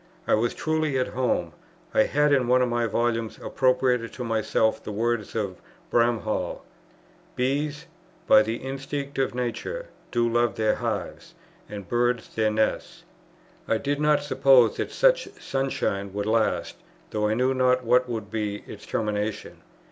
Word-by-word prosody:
I - - +3
was 115 +2 +1
truly 155 -3 0
at 130 - 0
home. 100 -10 -1 0.4
I - - +4
had 150 +1 +2
in 130 -3 +2
one 125 +1 +4
of 125 - 0
my 120 -1 0
volumes 115 -1 -1
appropriated 125 -2 +1
to 125 - -5
myself 110 -1 0
the - - -5
words 115 0 -1
of 100 -5 -3 0.3
Bramhall, 115 -2 0 0.7
"Bees, 145 +4 -1 0.4
by 110 - +7
the 110 +1 -1
instinct 135 +2 -5
of 130 -2 0
nature, 125 - -4 0.2
do 120 -1 +1
love 120 -2 +1
their 110 -1 +2
hives, - - -4 0.3
and 100 -3 -7
birds 120 +2 0
their 110 -1 +2
nests." 110 0 -1 0.6
I 110 - +2
did 145 +5 -2
not 150 -1 +3
suppose 135 -4 +4
that - - -3
such - - +3
sunshine 100 -7 -2
would 100 0 -2
last, 110 +1 0 0.3
though 105 0 0
I 110 - +1
knew 130 +3 +2
not 130 0 +2
what 125 +1 +3
would 110 -3 -4
be 105 -2 -3
its - - -11
termination. 105 -1 -3
120 Hz, 155 wpm, -25 LUFS, 110-135 Hz, 0.7 s, by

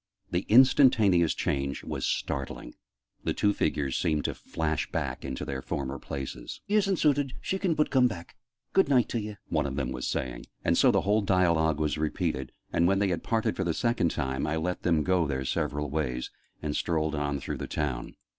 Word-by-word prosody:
The 90 +2 -1
instantaneous 110 - +5
change 70 0 -2
was - - -3
startling: - - -3 0.5
the - - -1
two 105 0 +2
figures 70 -8 0
seemed 75 -2 0
to - - 0
flash 80 -2 -3
back - - -3
into 65 -1 -4
their 65 -1 -4
former 70 0 -4
places. 70 0 -6
" - - -49
isn't 200 -2 +2
suited, 145 -4 +2
she 190 - -2
can 180 -5 +1
but 150 - +1
coom 130 -2 +5
back. 90 -7 -8 0.4
Good 195 -6 +4
night 125 -4 +4
t'ye!" 105 -3 -3
one - - +1
of 65 - -4
them 65 -3 -2
was 65 -1 -3
saying: - - -3 0.2
and - - +3
so - - +5
the - - +3
whole 105 +2 +2
dialogue 85 -6 +2
was 75 0 0
repeated, 65 -4 -1 0.2
and, 85 - +3
when 95 +1 +3
they 100 0 +2
had 85 - -1
parted 110 -1 0
for 95 - -1
the 85 -3 -1
second 115 -8 +1
time, 65 0 -2
I 75 - 0
let 90 +3 -2
them 80 -4 +2
go 90 -2 +2
their 65 -2 -2
several 75 +3 -1
ways, 65 -5 -2 0.3
and 75 -1 -2
strolled 80 -2 0
on 70 -2 -1
through - - -4
the - - -5
town. 70 -6 -3
80 Hz, 200 wpm, -28 LUFS, 70-105 Hz, 0.5 s, instantaneous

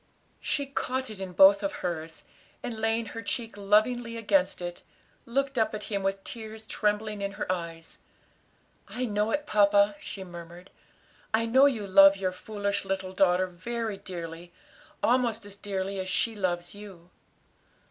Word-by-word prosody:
She 285 - -1
caught 260 -2 -3
it 210 - -9
in 190 -2 -6
both 195 +2 +7
of 195 - -1
hers 160 -2 -4 0.4
and 230 -2 -4
laying 225 +1 +1
her 230 - -6
cheek 230 -2 -3
lovingly 230 +4 +2
against 200 -4 +2
it, 175 0 -6 0.5
looked 270 +1 0
up 220 -1 +1
at 210 - -6
him 200 -1 -2
with 195 0 -1
tears 220 -1 -8
trembling 210 -1 -1
in 200 0 -3
her - - -4
eyes. 165 -2 -5 0.9
"I 255 +1 -3
know 210 -1 0
it, 295 +5 -1
papa," 205 -3 +4
she 195 - -6
murmured. 175 0 -11 0.6
"I 230 +1 +1
know 260 +5 +6
you 225 -7 -1
love 195 0 +7
your 190 -1 -1
foolish 200 +1 -3
little 190 -1 -3
daughter 185 -1 +3
very 215 +4 -4
dearly; 170 -2 -8 0.5
almost 235 -3 +2
as 205 -1 -8
dearly 195 -1 -3
as 185 0 -3
she 225 +5 +2
loves 175 -4 -2
you." 190 -4 -12
200 Hz, 160 wpm, -28 LUFS, 185-225 Hz, 0.9 s, both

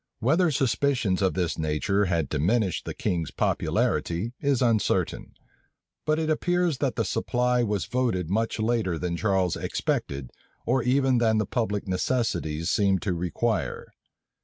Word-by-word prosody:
Whether 160 +9 +3
suspicions 130 -7 +1
of 95 -1 +1
this 90 -4 -1
nature 80 +7 +1
had 85 -5 0
diminished 90 +6 0
the - - -5
king's 85 -3 -1
popularity, 90 +8 0
is 140 -3 +1
uncertain; 115 -4 0 0.7
but 155 0 +2
it 160 -1 -1
appears 175 -1 +1
that 135 -5 0
the 115 - 0
supply 125 +5 +1
was 105 -5 -1
voted 115 -9 -1
much 110 +6 0
later 110 -6 0
than 90 +1 -2
Charles 95 -2 +1
expected, 70 -3 -2 0.3
or 130 +2 +2
even 130 +1 +2
than 110 -2 +3
the 105 - +1
public 105 -2 -2
necessities 90 -6 -1
seemed 100 -3 +2
to 95 - 0
require. 85 -1 -2
110 Hz, 140 wpm, -26 LUFS, 90-125 Hz, 0.7 s, Whether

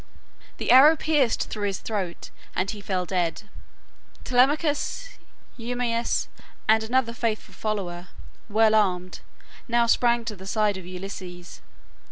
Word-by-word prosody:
The - - 0
arrow 280 +6 +8
pierced 295 -7 +1
through 205 -1 -2
his 195 -2 -2
throat 195 -6 -4 0.2
and 190 +2 0
he 210 - -8
fell 185 -2 -2
dead. 175 0 -1 0.8
Telemachus, 295 - +1 0.4
Eumaeus, 235 0 -1 0.4
and 220 0 +5
another 235 +1 0
faithful 225 -2 -3
follower, 185 -5 -4 0.4
well 220 +1 +4
armed, 185 -4 +1 0.5
now 235 -1 +3
sprang 235 0 +2
to 215 - -4
the 190 0 -11
side 210 0 +1
of 180 -2 -9
Ulysses. 180 -1 -8
215 Hz, 125 wpm, -25 LUFS, 190-240 Hz, 0.8 s, arrow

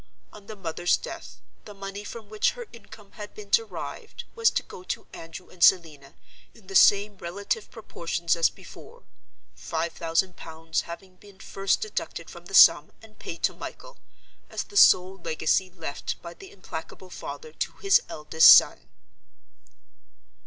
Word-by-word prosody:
On 205 -1 -14
the 215 - -8
mother's 175 -2 0
death, - - -10 0.2
the 210 - -11
money 195 +1 -7
from 220 +1 -9
which 215 0 0
her 485 - -8
income 210 -2 -15
had 210 -2 -10
been 425 0 -11
derived 455 0 -2
was 460 -1 +3
to - - -2
go - - -12
to - - -4
Andrew 165 +2 -10
and 180 - -4
Selina, 155 -7 +3 0.4
in 220 - -19
the 195 - -10
same 200 0 +4
relative 200 +4 -4
proportions 170 -6 -3
as 165 -1 +3
before—five 170 - -9
thousand 165 +2 -1
pounds 160 0 -4
having 185 +2 -10
been 200 0 -18
first 195 0 -1
deducted 430 - -5
from - - -13
the - - -4
sum - - +7
and 215 -1 -18
paid 165 - -8
to - - +2
Michael, - - -10 0.5
as - - -4
the 405 - -17
sole 185 - +5
legacy 165 +2 0
left 165 -5 -6
by 170 0 -8
the 190 +2 -14
implacable 185 0 -9
father 470 - -8
to - - -4
his 395 -1 +3
eldest 155 +1 +6
son. - - +5
190 Hz, 155 wpm, -26 LUFS, 170-215 Hz, 0.5 s, sum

